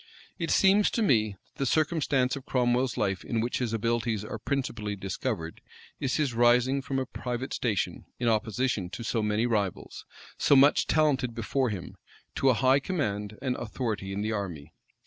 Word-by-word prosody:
It 165 - -2
seems 200 +2 +4
to 230 - 0
me, 110 - +3
that - - -31
the 135 - +1
circumstance 145 -3 +1
of 135 - -9
Cromwell's 125 0 +1
life 95 -3 -1
in 115 - -2
which 120 +2 -1
his 120 -3 -1
abilities 115 -1 -1
are 110 - -6
principally 115 -5 -2
discovered, 90 -4 -4 0.4
is 130 - -1
his 145 -5 0
rising 120 +3 +3
from 135 0 -3
a 130 - 0
private 125 +1 -4
station, 110 -6 -1
in 120 - -1
opposition 110 -2 0
to 115 - -7
so 115 0 0
many 105 +2 +1
rivals, 105 -6 -2 0.3
so 145 - +5
much 140 +2 +5
advanced 135 -6 +2
before 125 +3 0
him, 95 -5 -6 0.4
to 135 - +2
a 125 - +4
high 130 +3 +4
command 105 - -3
and 130 -2 0
authority, 110 -4 -3
in 100 +1 -3
the 110 - -1
army. 85 -8 -5
120 Hz, 175 wpm, -28 LUFS, 105-135 Hz, 0.4 s, so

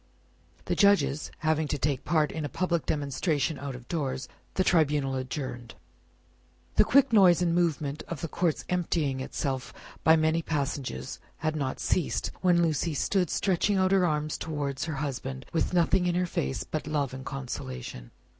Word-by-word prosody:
The - - 0
Judges 155 -9 +3 0.2
having 155 0 +2
to 145 - -1
take 140 -1 -1
part 155 -3 +2
in 160 - -4
a 145 - -3
public 170 +3 -1
demonstration 145 +1 0
out 140 -1 -5
of 125 -1 -11
doors, 135 -5 -2 0.3
the 190 - +3
Tribunal 150 -6 +2
adjourned. 130 -2 -5 1.0
The - - +8
quick 275 -2 +4
noise 185 -5 +7
and 170 -1 +2
movement 155 -4 0
of 165 -5 -5
the 165 - -2
court's 170 0 -1
emptying 165 -6 0
itself 130 0 -3 0.3
by 160 - +7
many 160 +1 +2
passages 140 - -3 0.2
had 155 -1 -1
not 140 -3 -2
ceased, 180 - 0
when 175 -2 +4
Lucie 160 0 0
stood 180 +3 +1
stretching 195 +1 +1
out 185 0 +3
her 195 -2 +4
arms 155 -2 0
towards 145 -4 -3
her 160 -2 -3
husband, 135 -1 -4
with 165 - +1
nothing 180 +1 +3
in 175 - +1
her 180 0 +2
face 65 - -2
but 155 - -4
love 145 -4 -1
and 130 0 -7
consolation. 65 - -6
155 Hz, 165 wpm, -28 LUFS, 135-170 Hz, 1.0 s, The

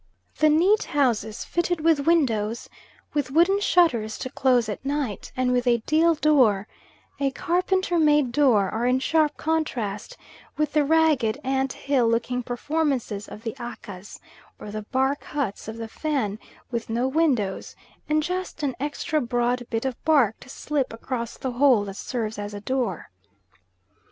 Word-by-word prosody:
The 310 - +5
neat 365 +8 +3
houses, 220 -6 +1
fitted 345 -1 -1
with 315 -3 +2
windows, 235 -9 +1 0.5
with 290 -3 -1
wooden 345 +8 +3
shutters 250 - +2
to 255 - -6
close 250 -4 +2
at 210 +2 -5
night, 275 -7 -3
and 255 -1 +1
with 250 0 +1
a 235 -2 +2
deal 325 +2 +3
door 255 -10 +3 0.5
a 275 -1 +2
carpenter 360 +4 0
made 295 -5 +3
door 235 -7 +3
are 230 +2 -1
in 250 +1 +3
sharp 310 +2 +1
contrast 300 - -2 0.4
with 305 -1 0
the 300 -1 +4
ragged 295 -7 +2
ant 265 0 0
hill 270 -4 +1
looking 235 +2 0
performances 250 -4 -2
of 215 - -10
the 225 - -3
Akkas, 205 -5 -9 0.4
or 210 - -9
the 215 +1 -4
bark 265 +5 -1
huts 260 -11 -4
of 220 +1 -6
the 225 -1 -5
Fan, 225 -6 -2 0.3
with 230 -2 -3
no 235 +3 0
windows, 265 -10 0 0.3
and 305 0 +2
just 365 -2 -4
an 270 -3 -1
extra 295 +2 -1
broad 245 0 -1
bit 225 +2 -2
of 260 -2 -4
bark 280 -9 +3
to 255 - -14
slip 285 0 -2
across 235 0 -5
the 260 - -3
hole 245 -4 +4
that 195 -1 -7
serves 220 -1 -4
as 205 0 -5
a - - -5
door. 240 -5 -3
260 Hz, 160 wpm, -24 LUFS, 225-305 Hz, 0.5 s, The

